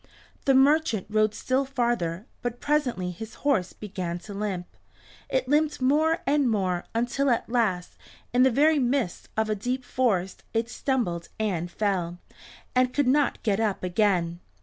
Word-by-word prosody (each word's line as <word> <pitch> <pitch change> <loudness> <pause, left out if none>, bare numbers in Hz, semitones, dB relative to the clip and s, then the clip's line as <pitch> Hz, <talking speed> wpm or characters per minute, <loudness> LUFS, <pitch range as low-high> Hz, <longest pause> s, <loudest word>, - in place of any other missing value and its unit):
The 270 - +4
merchant 275 - +3
rode 215 0 +2
still 260 +1 0
farther, 235 -9 -1 0.2
but 245 0 -3
presently 255 -12 0
his 220 +5 -9
horse 255 -12 +2
began 185 -4 -5
to 205 - -9
limp. 195 -3 -3 0.6
It 260 -1 0
limped 300 +2 +2
more 310 +5 +2
and 280 -2 +3
more, 185 -5 0
until 245 +4 +1
at 235 - +1
last, 215 -7 -1 0.3
in 250 - +4
the 260 - +6
very 295 +5 +4
midst 250 -7 -1
of 220 0 +2
a 215 - +1
deep 245 +5 -2
forest, 195 -9 0
it 225 +1 0
stumbled 220 -11 -1
and 180 -6 -1
fell, 180 -3 -1 0.6
and 255 -1 +3
could 285 -3 +2
not 285 +2 +2
get 205 -3 +1
up 215 -4 0
again. 180 -3 +1
230 Hz, 155 wpm, -26 LUFS, 190-265 Hz, 0.6 s, the